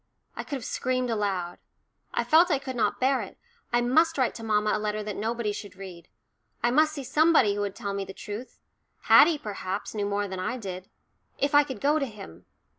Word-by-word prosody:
I - - -4
could 285 - -5
have 260 - -6
screamed 255 -1 -1
aloud. 195 -5 -2 0.5
I - - 0
felt 335 +3 +5
I 305 - +3
could 265 -1 -6
not 235 - 0
bear 265 +1 +2
it - - -9 0.3
I 240 - +3
must 320 +7 +3
write 255 -3 +1
to 225 - -9
mamma 210 -1 +1
a - - 0
letter 210 0 -2
that 210 -2 -5
nobody 225 0 -2
should 205 -1 -8
read. 185 -3 -10 0.6
I 240 - +3
must 310 +4 +3
see 280 -3 -5
somebody 285 -5 +4
who 205 - -3
would 200 -1 -3
tell 200 -4 -4
me 200 0 -2
the 195 - -8
truth 210 +5 -8 0.4
Haddie, 320 0 +6
perhaps, 200 -4 -5
knew 205 -2 -2
more 205 0 -1
than 190 -1 -6
I 240 +7 -2
did. 190 -4 -7 0.5
If 280 +1 0
I 290 0 +7
could 265 -7 -8
go 295 +2 +3
to 275 - -1
him! 90 - -12
225 Hz, 215 wpm, -27 LUFS, 200-270 Hz, 0.6 s, I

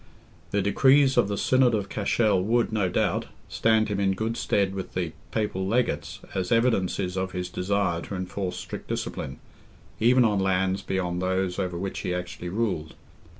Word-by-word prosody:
The 100 -1 0
decrees 135 +6 +4
of - - +4
the 100 0 -2
Synod 130 0 +3
of 100 -2 -2
Cashel 105 -2 +1
would, 115 +5 +1
no 100 -4 +1
doubt, - - 0 0.2
stand 110 -1 +2
him 105 -2 -2
in 95 -1 +2
good 110 +3 -2
stead 100 -4 +1
with 95 -1 -6
the 90 -3 -1 0.2
Papal 105 -4 -1
legates 120 +4 -1
as 95 -2 -2
evidences 95 -6 +1
of 95 0 -2
his 90 -1 -3
desire 90 -2 0
to 100 - -6
enforce 95 0 -3
strict - - -7
discipline, 65 - -4 0.6
even 125 +2 +5
on 105 -3 +2
lands 95 0 +1
beyond 90 -2 -2
those 95 0 0
over 90 -3 -2
which 95 +2 -4
he 90 - -2
actually 90 -1 -5
ruled. 95 -6 -2
95 Hz, 170 wpm, -26 LUFS, 90-110 Hz, 0.6 s, even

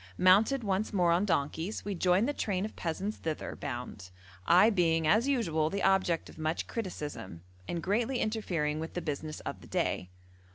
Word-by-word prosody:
Mounted 215 +8 +5
once 200 +1 0
more 180 -4 +3
on 175 +4 +3
donkeys, 165 +3 -1
we 205 - -2
joined 185 +4 +2
the 290 - 0
train 200 -7 -1
of 215 - -8
peasants 190 +6 -3
thither 160 -2 -4
bound; 120 -8 -6 0.4
I 185 +6 +6
being 165 -5 +2
as 215 - +4
usual 165 - +1
the 200 +4 -3
object 190 -3 +2
of - - -13
much 155 +1 -1
criticism, 150 - -6 0.2
and 170 -1 -3
greatly 230 +6 0
interfering 175 -10 -1
with 160 +1 -6
the 175 - -1
business 155 0 -4
of - - -6
the - - -13
day. 90 - -1
180 Hz, 175 wpm, -30 LUFS, 155-210 Hz, 0.4 s, I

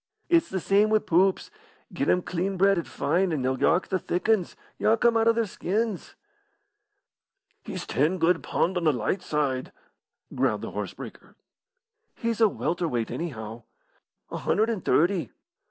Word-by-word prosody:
"It's 335 -1 +3
the 190 - -2
same 200 +4 +3
wi' 215 - +4
poops. 190 -1 +1 0.4
Get - - -1
'em 180 - +3
clean 185 +2 -2
bred 195 0 +4
an' 170 - -5
fine, 175 +5 0
an' 145 -5 -1
they'll 130 0 0
yark 175 +3 +2
the 185 - 0
thick 175 +4 -3
'uns 215 -6 +1 0.2
yark 225 +2 +2
'em 235 -1 +5
out 225 0 +3
o' - - +7
their 230 0 0
skins." 205 +1 -3 1.5
"He's 185 -2 -6
ten 155 +7 +1
good 165 0 +2
pund 185 +2 0
on 175 - -1
the 155 - +4
light 175 +9 -1
side," 145 -6 -2 0.6
growled - - 0
the - - -5
horse - - -5
breaker. - - -11 0.8
"He's 230 -1 -2
a 220 - +6
welter 175 -2 -2
weight, 120 -6 -2
anyhow." 115 -8 -5 0.7
"A - - -3
hundred 220 +2 +1
and 210 -6 -4
thirty." 170 - +2
180 Hz, 170 wpm, -26 LUFS, 160-210 Hz, 1.5 s, o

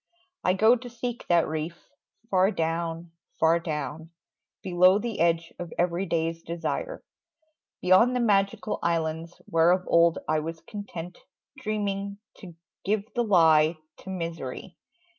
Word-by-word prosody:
I 185 - +3
go 220 +5 +5
to 245 0 -8
seek 240 0 -5
that 170 -2 +4
reef, 160 +2 -4 0.5
far 190 0 +4
down, 165 -2 -2 0.3
far 165 +1 +4
down 160 0 -5 0.5
Below 185 +1 +5
the 225 +1 -4
edge 165 0 +1
of 175 -2 -6
everyday's 170 -2 0
desire, 170 - -4 0.8
Beyond 190 +8 +5
the - - +1
magical 205 -2 +1
islands, 165 0 -2
where 165 +1 +3
of 180 +1 +3
old 170 0 +4
I 155 0 +2
was 165 +1 -5
content, 180 -2 -8 0.4
dreaming, 200 -2 -2 0.2
to 180 -5 -11 0.3
give 210 +2 -1
the 240 - +1
lie 160 -5 +4 0.2
To - - -11
misery. 165 -7 -5
175 Hz, 130 wpm, -27 LUFS, 165-200 Hz, 0.8 s, go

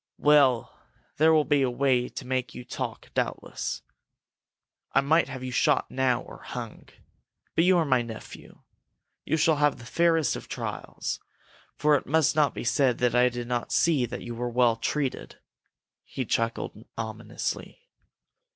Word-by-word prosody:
"Well, 140 -6 +4 0.4
there 160 +2 +5
will 155 -2 +4
be 145 -2 +3
a 130 - +2
way 125 -1 +1
to 130 - -8
make 130 -1 -2
you 125 - -8
talk, - - -6
doubtless. - - -3 1.1
I 135 - +5
might 160 +4 +3
have 130 - -6
you 130 - -4
shot - - +2
now 130 -2 +1
or - - -12
hung. - - -8 0.6
But 165 - +3
you 185 0 +5
are 165 - +2
my 130 -4 +3
nephew. 115 -2 -10 0.6
You 160 - +1
shall 160 -1 +3
have 145 -1 +2
the 120 - -12
fairest 165 -2 +2
of - - -8
trials, - - -4 0.6
for 150 0 +3
it - - -8
must 155 0 +3
not 150 -3 +2
be - - -4
said 125 +1 +2
that 125 -1 +1
I 125 +1 +5
did 120 -1 -5
not 120 -1 -2
see 150 -8 +3
that 125 - -6
you 120 - -6
were 120 +1 -3
well 120 -1 +3
treated!" 135 +3 -3 0.7
He 130 - -5
chuckled 115 -1 -2
ominously. 115 - -5
130 Hz, 160 wpm, -27 LUFS, 120-150 Hz, 1.1 s, there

